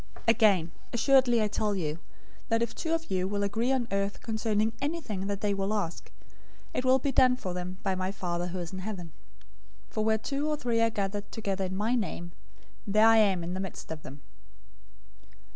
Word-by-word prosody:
018:019 - - -24
Again, 205 -8 +4 0.2
assuredly 245 -2 +4
I - - +2
tell 210 0 0
you, 160 -3 -2 0.5
that 230 0 +3
if 235 - -3
two 325 - -3
of 325 -6 -6
you 185 0 +1
will 200 +1 -1
agree 225 +5 0
on 255 -3 +1
earth 200 0 -1
concerning 220 -1 0
anything 280 - -2
that 200 -1 -3
they 205 -1 +1
will 195 +2 -1
ask, 175 -5 -3 0.6
it - - -1
will 260 0 +5
be 275 +1 -1
done 255 -1 +5
for 185 -7 -4
them 180 +1 -5
by 195 -2 +1
my 185 0 -1
Father 175 -2 -2
who 180 +1 -5
is 175 0 -5
in 190 - -5
heaven. 185 -4 -5 0.8
018:020 - - -27
For 215 - 0
where 220 0 +3
two 280 +6 -2
or 300 - 0
three 235 -4 +1
are 230 - +4
gathered 205 -1 -3
together 195 -4 -2
in 185 0 -4
my 215 +4 +1
name, 180 -7 -2 0.6
there 215 +2 +5
I 225 0 +7
am 195 -5 +4
in 175 +2 -3
the 185 - -3
midst 190 -4 -6
of 160 -1 -5
them." 140 0 -10
205 Hz, 210 wpm, -29 LUFS, 185-230 Hz, 0.8 s, I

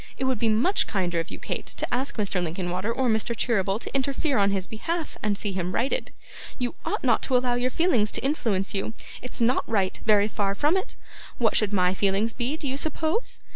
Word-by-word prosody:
It - - -3
would 260 -3 +1
be 225 - +2
much 305 - +3
kinder 175 -4 0
of 165 - -3
you, - - -7
Kate, - - -4
to - - -4
ask 260 +3 -1
Mr. 195 -4 0
Linkinwater 180 +5 -2
or 255 +2 0
Mr. 220 0 +1
Cheeryble 195 -4 +1
to - - -7
interfere 275 0 +1
in 200 0 +4
his 195 -2 -1
behalf, 320 - -3
and 205 -1 0
see 205 0 -2
him 185 -1 -2
righted. 270 - 0 0.5
You 245 -2 -2
ought - - -2
not 240 -4 +3
to 255 - +2
allow 245 0 +1
your 245 +1 +1
feelings 255 -9 +2
to - - -1
influence 220 -9 0
you; 200 +2 -2 0.3
it's 250 - -4
not 240 +2 +3
right, 195 -4 +1
very 210 -2 +4
far 200 -2 -1
from 295 - +3
it. 380 +6 -2 0.4
What 225 -3 +2
should 215 -2 +2
my 180 -2 +3
feelings 200 +3 +1
be, 260 +5 -2
do 300 - -4
you 265 +1 -1
suppose? 315 - -1
225 Hz, 215 wpm, -26 LUFS, 195-260 Hz, 0.5 s, in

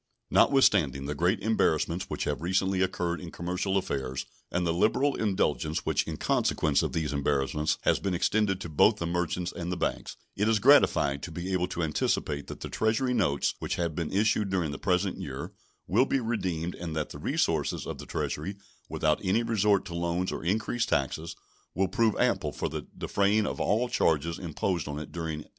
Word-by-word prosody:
Notwithstanding 80 - +4
the 75 - -2
great 85 +5 +1
embarrassments 90 -5 +1
which - - -3
have 75 0 -2
recently 95 +2 +1
occurred 90 -2 -1
in 90 - -7
commercial 90 +3 -2
affairs, 65 -8 -2 0.2
and 90 0 -1
the 85 - +1
liberal 130 +10 +2
indulgence 80 - 0
which - - +1
in - - -4
consequence 75 -2 +1
of - - -2
these 80 -3 -1
embarrassments 70 +1 0
has - - +2
been 95 -2 -1
extended 100 +1 +1
to - - -4
both 75 - +4
the 85 - -3
merchants 90 +1 -1
and 85 +1 -5
the 90 - -2
banks, - - -3 0.2
it 105 +2 +1
is 110 - +4
gratifying 105 - +5
to 85 - -7
be 90 +3 -4
able 90 -1 +1
to 85 - -3
anticipate 75 -2 -1
that - - -8
the - - -4
Treasury 115 +4 +1
notes 75 - +1
which - - -2
have 85 -2 -1
been 80 0 -3
issued 105 0 +2
during 90 -6 0
the 70 - -6
present 95 0 0
year - - -6 0.3
will 120 +8 +3
be 135 - +1
redeemed 90 -8 -2
and 85 -2 -6
that 75 -1 -2
the - - -8
resources - - 0
of - - -6
the - - -9
Treasury, 90 +7 -3 0.3
without 75 -1 +1
any 100 +5 +2
resort 105 -4 +2
to 90 - -7
loans 85 +2 -1
or - - -5
increased 110 +6 0
taxes, 80 +5 -1 0.4
will 95 0 +2
prove 110 +3 +2
ample - - +1
for - - -3 0.3
defraying 100 +2 +2
all 115 +5 0
charges 80 -6 +1
imposed 85 -1 -2
on 75 0 -4
it 75 - -7
during 80 -2 -4
1838. - - -15
90 Hz, 190 wpm, -28 LUFS, 80-100 Hz, 0.4 s, gratifying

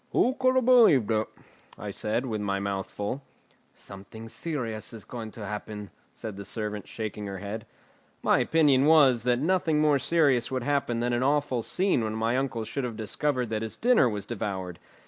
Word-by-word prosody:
"Who 255 - +3
could 255 0 +3
have 260 -2 +3
believed 215 - +6
it?" 110 0 +1 0.5
I - - -5
said, 110 +4 -1
with 110 -4 -3
my 100 -1 -1
mouth 100 -1 -3
full. 105 +7 -4 0.5
"Something 105 +3 -11
serious 115 -8 -4
is 110 - -9
going 115 -3 -6
to 110 - -7
happen," 105 0 -6 0.2
said 110 -3 -7
the 100 - -6
servant, 105 -1 -4
shaking 105 -2 -5
her 100 -1 -5
head. 105 +3 -6 0.6
My - - +4
opinion 145 -4 +4
was, 145 -6 +6
that 125 -1 +3
nothing 160 +1 +1
more 150 -2 +4
serious 135 -5 +2
would 130 -2 -2
happen 135 -4 0
than 120 0 0
an 120 - +1
awful 140 -2 +1
scene 185 - +1
when 110 0 -2
my 115 +2 0
uncle 130 -4 -1
should 130 +5 -4
have 120 -3 -4
discovered 125 +2 -1
that 110 -1 -1
his 110 -1 -3
dinner 235 - +4
was 105 -2 -4
devoured. 95 -6 -4
120 Hz, 185 wpm, -27 LUFS, 105-140 Hz, 0.6 s, believed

